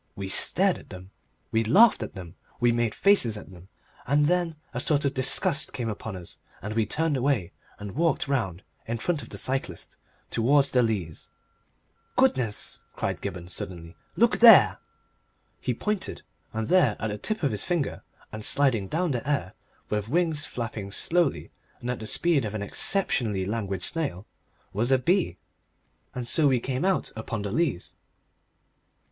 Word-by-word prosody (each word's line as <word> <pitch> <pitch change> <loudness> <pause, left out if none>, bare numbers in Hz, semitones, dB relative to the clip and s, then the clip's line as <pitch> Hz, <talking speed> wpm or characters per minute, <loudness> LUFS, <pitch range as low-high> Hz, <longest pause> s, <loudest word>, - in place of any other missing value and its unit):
We 95 -1 -5
stared 190 - +4
at - - -17
them, 95 0 -10 0.4
we 110 0 +2
laughed 200 - +6
at 110 - -6
them, 90 -3 -9 0.2
we 120 -1 +4
made 120 -1 0
faces 160 - +3
at 105 - -11
them, 90 0 -14 0.4
and 145 +3 +3
then 175 0 +1 0.2
a 125 - -2
sort 145 +2 +1
of 140 - +1
disgust 135 +3 +1
of - - -20
them - - -6
came 120 -3 -2
upon 105 -1 -5
us, 90 -2 -9 0.2
and 105 +3 -5
we 110 -2 +1
turned 160 +4 0
away 125 -9 0 0.3
and 105 -1 -7
walked 160 - 0
round 105 -10 -1 0.2
in 115 +1 -2
front 160 +5 -1
of 115 - -11
the - - -7
cyclist 130 -10 -3 0.3
towards 140 +4 +3
the 125 - +4
Leas. 100 -9 -2 0.9
"Goodness!" 130 - +1
cried - - -3
Gibberne, 85 0 -5
suddenly; 85 -2 -5 0.2
"look - - +3
there!" - - +8 0.8
He - - -2
pointed, 210 - -3 0.3
and 110 0 -3
there 155 - +3
at 110 - -2
the 105 - -5
tip 215 -4 -3
of 140 - +2
his 105 -2 -2
finger 170 -6 -1 0.3
and 110 0 -6
sliding 120 -7 +2
down 170 - 0
the 125 +2 -3
air 140 -11 -1 0.4
with 105 0 -1
wings 160 -1 +1
flapping 110 -4 -5
slowly 170 - 0 0.3
and 125 - -3
at 125 - -4
the 110 - -6
speed 165 +4 +2
of 110 -1 -4
an 105 - -3
exceptionally 110 - 0
languid 100 -3 -3
snail 140 - -1 0.5
was 115 +6 0
a 130 - +6
bee. 165 - +1 0.8
And 125 -2 -4
so 150 +4 +3
we 130 -3 +3
came 130 +5 -2
out 190 -1 0
upon 110 -1 -4
the 100 - -3
Leas. 155 - -1
120 Hz, 175 wpm, -26 LUFS, 105-150 Hz, 0.9 s, there